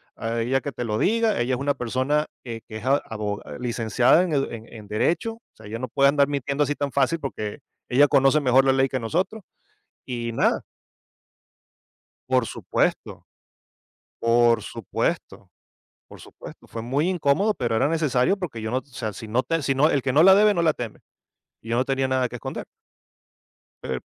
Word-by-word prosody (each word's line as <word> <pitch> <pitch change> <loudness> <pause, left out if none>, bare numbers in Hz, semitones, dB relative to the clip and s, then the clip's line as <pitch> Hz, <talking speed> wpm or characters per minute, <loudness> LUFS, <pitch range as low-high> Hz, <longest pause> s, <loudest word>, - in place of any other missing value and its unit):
a 115 +1 -3
ella 130 +3 +1
que 145 - -4
te 120 - -5
lo 105 -1 -1
diga, 225 - +2
ella 125 +2 0
es 125 - -6
una 140 +1 +1
persona, 130 +4 -1 0.2
que 115 -2 -6
que 110 - -7
es 110 - -9
abo 110 -7 -1 0.2
licenciada 120 - +3
en 170 -4 -2
edu 135 -1 +2
en 115 -1 -9
en 105 -2 -11
derecho. 165 - 0
O 230 - -18
sea, 110 - -15
ella 110 +2 -5
no 130 - -3
puede 140 +3 +4
andar 140 -1 +3
mintiendo 140 0 -1
así 145 +1 -1
tan 145 -1 -3
fácil, 140 +5 +1
porque 110 -4 -5 0.3
ella 140 +4 +5
conoce 135 +2 +4
mejor 130 -1 +4
la 135 - +5
ley, 135 0 +3
que 130 - -2
nosotros". 180 - -2 0.7
Y 120 -2 -4
nada. - - +1 1.7
Por 130 -3 +2
supuesto. - - -2 1.0
Por 115 0 +3
supuesto. 115 -5 -4 0.6
Por - - -13
supuesto. - - -13
Fue 115 - -6
muy 140 +8 0
incómodo, 185 +4 +2
pero 120 - -1
era 125 - +2
necesario, 155 +1 +1
porque 160 - -5
yo 110 - -3
no 130 - +1
O - - -8
sea, 120 -6 -5
si 110 - -9
no 120 +4 +1
te 165 +4 -1
si 135 - +1
no 150 +4 +4
El 140 - +1
que 130 -1 0
no 155 +4 +5
la 190 +1 +8
debe, 210 +1 +5
no 170 - +1
la 160 -2 +4
teme. 120 -5 -7 0.6
Y 115 - -11
yo 115 - +1
no 130 - +1
tenía 135 -1 0
nada 130 -1 +1
que 120 - -9
esconder. 115 - -6 1.2
Per 65 -1 -3
130 Hz, 195 wpm, -24 LUFS, 115-145 Hz, 1.7 s, la